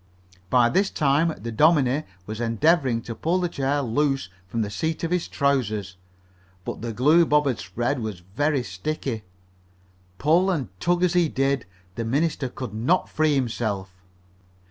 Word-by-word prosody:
By 125 Hz, -2 st, +5 dB
this 195 Hz, +10 st, +2 dB
time 150 Hz, +3 st, +2 dB
the 115 Hz, +2 st, -5 dB
dominie 150 Hz, +2 st, +3 dB, 0.2 s
was 110 Hz, +3 st, -5 dB
endeavoring 125 Hz, 0 st, +2 dB
to 115 Hz, -, -5 dB
pull 165 Hz, +9 st, 0 dB
the 180 Hz, -, 0 dB
chair 140 Hz, -2 st, -1 dB
loose 135 Hz, -2 st, 0 dB, 0.2 s
from 115 Hz, +4 st, -1 dB
the 105 Hz, -, -5 dB
seat 160 Hz, +10 st, -2 dB
of 165 Hz, -, -1 dB
his 180 Hz, -1 st, 0 dB
trousers. 110 Hz, -, 0 dB, 0.7 s
But -, -, -5 dB
the 115 Hz, 0 st, -3 dB
glue 150 Hz, +10 st, +5 dB
Bob 150 Hz, -2 st, +3 dB
had 130 Hz, -5 st, 0 dB
spread 120 Hz, +9 st, -2 dB
was 110 Hz, -6 st, -5 dB
very 145 Hz, -3 st, +1 dB
sticky. 115 Hz, +4 st, -4 dB, 1.0 s
Pull 170 Hz, -, +3 dB
and 150 Hz, -, -1 dB
tug 175 Hz, -, +1 dB
as 180 Hz, -1 st, +3 dB
he 175 Hz, -3 st, +3 dB
did, 135 Hz, -5 st, 0 dB, 0.3 s
the 115 Hz, -, -3 dB
minister 140 Hz, +3 st, 0 dB
could 125 Hz, -3 st, -7 dB
not 125 Hz, +12 st, +1 dB
free 155 Hz, -1 st, +2 dB
himself. 110 Hz, -7 st, -2 dB
135 Hz, 160 wpm, -24 LUFS, 115-155 Hz, 1.0 s, By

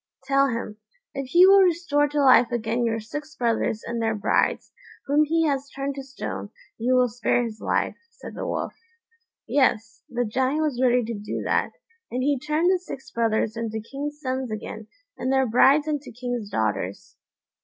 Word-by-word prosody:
"Tell 275 Hz, 0 st, +3 dB
him, 230 Hz, -4 st, -4 dB, 0.4 s
if 275 Hz, -1 st, -4 dB
he 345 Hz, +7 st, +6 dB
will 390 Hz, +1 st, +7 dB
restore 335 Hz, -5 st, +2 dB
to 295 Hz, 0 st, 0 dB
life 245 Hz, -3 st, +6 dB
again 235 Hz, 0 st, -1 dB
your 225 Hz, -1 st, 0 dB
six 295 Hz, +7 st, -7 dB
brothers 230 Hz, -3 st, 0 dB
and 235 Hz, 0 st, -3 dB
their 225 Hz, -1 st, 0 dB
brides, 205 Hz, -, 0 dB, 0.3 s
whom 290 Hz, +2 st, +3 dB
he 325 Hz, +2 st, +1 dB
has 280 Hz, -2 st, -1 dB
turned 275 Hz, 0 st, -4 dB
to 275 Hz, -, -6 dB
stone, 100 Hz, -, -6 dB, 0.3 s
you 250 Hz, +3 st, +2 dB
will 250 Hz, 0 st, +4 dB
spare 245 Hz, +1 st, 0 dB
his 225 Hz, -2 st, -6 dB
life," -, -, 0 dB
said -, -, -11 dB
the -, -, -5 dB
Wolf. -, -, -3 dB, 0.7 s
Yes, 225 Hz, -5 st, +1 dB
the 245 Hz, 0 st, -1 dB
Giant 260 Hz, +7 st, 0 dB
was 275 Hz, -5 st, -1 dB
ready 250 Hz, -1 st, +3 dB
to 230 Hz, +1 st, -4 dB
do 210 Hz, 0 st, -5 dB
that, -, -, 0 dB, 0.4 s
and 255 Hz, +1 st, -2 dB
he 285 Hz, -1 st, +1 dB
turned 310 Hz, +6 st, +1 dB
the 370 Hz, -, +2 dB
six 275 Hz, -6 st, -9 dB
brothers 225 Hz, -1 st, 0 dB
into 225 Hz, -1 st, -3 dB
king's 285 Hz, +6 st, -6 dB
sons 260 Hz, -3 st, -3 dB
again, 215 Hz, 0 st, -6 dB, 0.3 s
and 260 Hz, -, -1 dB
their 265 Hz, 0 st, +3 dB
brides 270 Hz, +6 st, +4 dB
into 295 Hz, -2 st, -3 dB
king's 245 Hz, -3 st, -4 dB
daughters. 105 Hz, -, -2 dB
255 Hz, 180 wpm, -24 LUFS, 225-285 Hz, 0.7 s, will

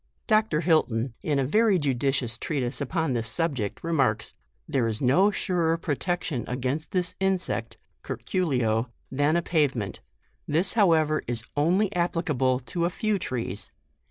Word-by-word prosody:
Dr. 215 Hz, -8 st, +2 dB
Hilton, 130 Hz, -8 st, +2 dB
in 150 Hz, -3 st, 0 dB
a 135 Hz, -, +1 dB
very 210 Hz, -, +3 dB
judicious 135 Hz, -4 st, 0 dB
treatise 130 Hz, -4 st, -2 dB
up 140 Hz, +5 st, -4 dB
on 160 Hz, -5 st, +1 dB
this 115 Hz, -1 st, -1 dB
subject, 135 Hz, -, -2 dB
remarks, 140 Hz, -10 st, +1 dB, 0.2 s
" -, -, -44 dB
There 125 Hz, -4 st, +1 dB
is 110 Hz, -1 st, -2 dB
no 160 Hz, +11 st, +4 dB
surer 170 Hz, -5 st, 0 dB
protection 165 Hz, -3 st, -2 dB
against 130 Hz, +5 st, -2 dB
this 180 Hz, -2 st, 0 dB
insect, 190 Hz, -1 st, -1 dB, 0.2 s
(curculio) 125 Hz, -, -1 dB, 0.2 s
than 145 Hz, +4 st, +2 dB
a 170 Hz, -, +1 dB
pavement; 135 Hz, -, 0 dB, 0.5 s
this 170 Hz, +6 st, +1 dB
how 200 Hz, -7 st, +5 dB
ever 155 Hz, -1 st, +2 dB
is 115 Hz, -2 st, -3 dB
only 185 Hz, +8 st, +2 dB
applicable 150 Hz, -7 st, +1 dB
to 145 Hz, +8 st, -2 dB
a -, -, +2 dB
few 210 Hz, +2 st, -1 dB
trees. 115 Hz, -, -3 dB
150 Hz, 150 wpm, -26 LUFS, 125-175 Hz, 0.5 s, how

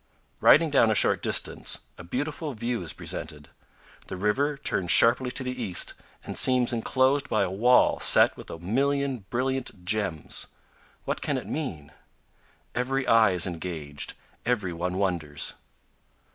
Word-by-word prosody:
Riding 160 Hz, 0 st, +5 dB
down 115 Hz, -5 st, +4 dB
a 110 Hz, -, +2 dB
short -, -, +3 dB
distance, -, -, +2 dB, 0.2 s
a -, -, -11 dB
beautiful 145 Hz, -, -4 dB
view 115 Hz, +1 st, -3 dB
is 85 Hz, -4 st, -3 dB
presented. 75 Hz, -2 st, -6 dB, 0.6 s
The 95 Hz, -, -6 dB
river 135 Hz, +9 st, 0 dB
turns 95 Hz, -10 st, -1 dB
sharply 120 Hz, +6 st, +5 dB
to 130 Hz, -, -1 dB
the 125 Hz, -, -3 dB
east 95 Hz, -6 st, -1 dB, 0.3 s
and -, -, -7 dB
seems 125 Hz, -1 st, +3 dB
inclosed 130 Hz, +4 st, +1 dB
by 110 Hz, -, +2 dB
a 90 Hz, -, -2 dB
wall 120 Hz, +6 st, +3 dB
set -, -, +4 dB
with -, -, -11 dB
a -, -, -7 dB
million 135 Hz, +5 st, -1 dB
brilliant 125 Hz, -6 st, -3 dB
gems. 95 Hz, -6 st, -1 dB, 0.6 s
What -, -, -3 dB
can 140 Hz, -, -1 dB
it 125 Hz, -, -6 dB
mean? 95 Hz, -, -5 dB, 0.8 s
Every 130 Hz, +2 st, -1 dB
eye 110 Hz, -4 st, +4 dB
is 90 Hz, -2 st, +4 dB
engaged, 80 Hz, -5 st, -5 dB, 0.3 s
every 105 Hz, -8 st, -1 dB
one 90 Hz, +2 st, -3 dB
wonders. 85 Hz, -7 st, -2 dB
110 Hz, 145 wpm, -26 LUFS, 90-130 Hz, 0.8 s, Riding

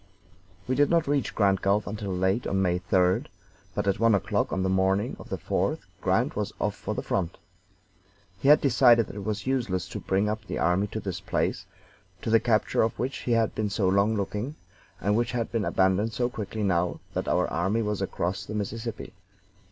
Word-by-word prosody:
We 130 Hz, -, +1 dB
did 145 Hz, +2 st, +3 dB
not 170 Hz, -1 st, +3 dB
reach 140 Hz, -2 st, 0 dB
Grand 100 Hz, -3 st, +3 dB
Gulf 100 Hz, +2 st, +2 dB
until 105 Hz, -1 st, -5 dB
late 95 Hz, +5 st, 0 dB
on 95 Hz, -, 0 dB
May 90 Hz, -2 st, +1 dB
3d, 90 Hz, 0 st, +2 dB, 0.5 s
but -, -, -1 dB
at 100 Hz, -, +1 dB
one 115 Hz, -2 st, +5 dB
o'clock 100 Hz, -, 0 dB
on 95 Hz, -, 0 dB
the -, -, +1 dB
morning 95 Hz, +1 st, +1 dB
of -, -, -11 dB
the -, -, -2 dB
4th -, -, -1 dB, 0.2 s
Grant -, -, +1 dB
was -, -, -2 dB
off -, -, 0 dB
for -, -, -4 dB
the -, -, -3 dB
front. 85 Hz, -3 st, -2 dB, 1.0 s
He -, -, -1 dB
had 150 Hz, +1 st, +7 dB
decided 120 Hz, -3 st, +5 dB
that -, -, -10 dB
it 100 Hz, -, -5 dB
was 105 Hz, 0 st, -3 dB
useless 110 Hz, -9 st, -1 dB
to -, -, -5 dB
bring 95 Hz, +2 st, 0 dB
up 110 Hz, +1 st, -2 dB
the -, -, -5 dB
army 90 Hz, +4 st, +2 dB
to 110 Hz, -, -5 dB
this 95 Hz, -4 st, -4 dB
place, -, -, -1 dB, 0.6 s
to 110 Hz, -, -1 dB
the 115 Hz, -, +6 dB
capture 110 Hz, -2 st, +2 dB
of 110 Hz, -, 0 dB
which 130 Hz, +1 st, -4 dB
we 120 Hz, -, +3 dB
had 115 Hz, -2 st, +2 dB
been 105 Hz, -1 st, -1 dB
so 100 Hz, -1 st, 0 dB
long 100 Hz, +4 st, +3 dB
looking, 105 Hz, +7 st, -3 dB, 0.4 s
and 105 Hz, +1 st, +1 dB
which 120 Hz, +2 st, 0 dB
had 115 Hz, -2 st, -2 dB
been 115 Hz, -4 st, 0 dB
abandoned 95 Hz, +4 st, +2 dB
so 120 Hz, +2 st, 0 dB
quickly 110 Hz, -1 st, -4 dB
now 90 Hz, -3 st, +1 dB
that -, -, -2 dB
our -, -, +2 dB
army 100 Hz, +6 st, 0 dB
was 105 Hz, -1 st, -2 dB
across 95 Hz, +1 st, -2 dB
the 105 Hz, +1 st, -6 dB
Mississippi. 110 Hz, +3 st, -4 dB
105 Hz, 205 wpm, -27 LUFS, 95-115 Hz, 1.0 s, had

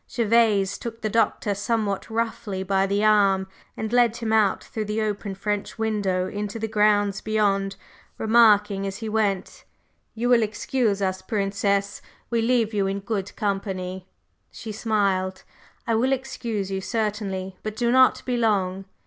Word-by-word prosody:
Gervase 220 Hz, -4 st, +2 dB
took 230 Hz, -1 st, -7 dB
the 215 Hz, -, -2 dB
Doctor 220 Hz, -2 st, +1 dB
somewhat 205 Hz, -1 st, -2 dB
roughly 220 Hz, -4 st, -2 dB
by 195 Hz, 0 st, +1 dB
the 200 Hz, +2 st, 0 dB
arm 200 Hz, -3 st, +4 dB, 0.3 s
and 220 Hz, +1 st, -4 dB
led 240 Hz, -2 st, +4 dB
him 225 Hz, -2 st, -2 dB
out 215 Hz, -3 st, +3 dB
through 215 Hz, -1 st, -5 dB
the 210 Hz, +1 st, -2 dB
open 205 Hz, -2 st, -2 dB
French 205 Hz, +1 st, -3 dB
window 205 Hz, -5 st, 0 dB
into 205 Hz, +1 st, -4 dB
the 220 Hz, 0 st, -3 dB
grounds 210 Hz, -2 st, +2 dB
beyond, 200 Hz, -2 st, 0 dB, 0.4 s
remarking 210 Hz, -3 st, +4 dB
as 195 Hz, 0 st, -5 dB
he 225 Hz, -1 st, -5 dB
went: 210 Hz, -3 st, -1 dB, 0.5 s
"You 240 Hz, +2 st, -1 dB
will 240 Hz, -2 st, +5 dB
excuse 215 Hz, -1 st, 0 dB
us, 190 Hz, 0 st, -1 dB
Princess? 200 Hz, -2 st, -1 dB, 0.3 s
We 230 Hz, -1 st, +2 dB
leave 230 Hz, -2 st, +1 dB
you 200 Hz, -2 st, +1 dB
in 195 Hz, +1 st, -2 dB
good 200 Hz, -1 st, -4 dB
company!" 190 Hz, -3 st, -3 dB, 0.4 s
She 220 Hz, -, -8 dB
smiled. 200 Hz, -4 st, 0 dB, 0.4 s
"I 230 Hz, -, 0 dB
will 250 Hz, +4 st, +2 dB
excuse 230 Hz, -6 st, -3 dB
you, 190 Hz, 0 st, -2 dB
certainly! 200 Hz, -4 st, -3 dB
But 215 Hz, -1 st, -5 dB
do 235 Hz, +1 st, +1 dB
not 260 Hz, +1 st, +4 dB
be 250 Hz, -1 st, -1 dB
long!" 195 Hz, -4 st, 0 dB
210 Hz, 155 wpm, -24 LUFS, 195-225 Hz, 0.5 s, will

